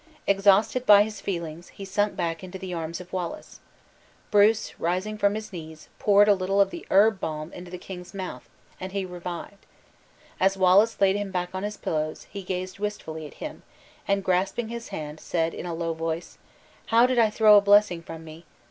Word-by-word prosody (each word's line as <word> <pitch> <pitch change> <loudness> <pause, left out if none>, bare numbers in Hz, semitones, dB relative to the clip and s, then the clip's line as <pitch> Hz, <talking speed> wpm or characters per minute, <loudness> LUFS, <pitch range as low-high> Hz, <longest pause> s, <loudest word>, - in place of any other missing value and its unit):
Exhausted 200 +5 +3
by 205 -1 +9
his 215 -1 -7
feelings, 170 -3 -5
he 195 - -10
sunk 205 +2 0
back 165 +1 -3
into 185 +1 -7
the 185 -1 -6
arms 165 0 -4
of 180 0 -12
Wallace. 180 -3 -5 0.7
Bruce, 210 +1 +3
rising 185 +5 -1
from 205 -1 +1
his 215 -1 -6
knees, 160 -3 -9
poured 205 0 +5
a 205 - +7
little 195 +1 0
of 200 - +4
the 345 -1 -8
herb 205 +1 +4
balsam 155 0 -5
into 180 0 -9
the 180 - -7
king's 180 -1 -9
mouth, 190 -2 -7 0.3
and 185 +1 -6
he 195 -1 -2
revived. 180 +2 -7 0.8
As 195 +1 +2
Wallace 190 +4 +4
laid 195 0 +4
him 205 -1 -3
back 180 -1 -3
on 185 - -3
his 210 +1 -4
pillows, 155 -1 -3
he 200 - -6
gazed 185 0 -5
wistfully 160 -7 -5
at - - -15
him, - - -7 0.5
and 200 0 +1
grasping 195 +5 0
his 235 0 -6
hand, 150 0 -6
said 165 0 -1
in - - -6
a 170 - -3
low 165 0 -2
voice: 165 +1 -4 0.5
"How 230 +1 +5
did 255 -1 +1
I 225 -2 +5
throw 215 0 +6
a 205 - +8
blessing 205 -3 +4
from 165 -1 -9
me! 160 +2 -12
190 Hz, 195 wpm, -26 LUFS, 170-205 Hz, 0.8 s, by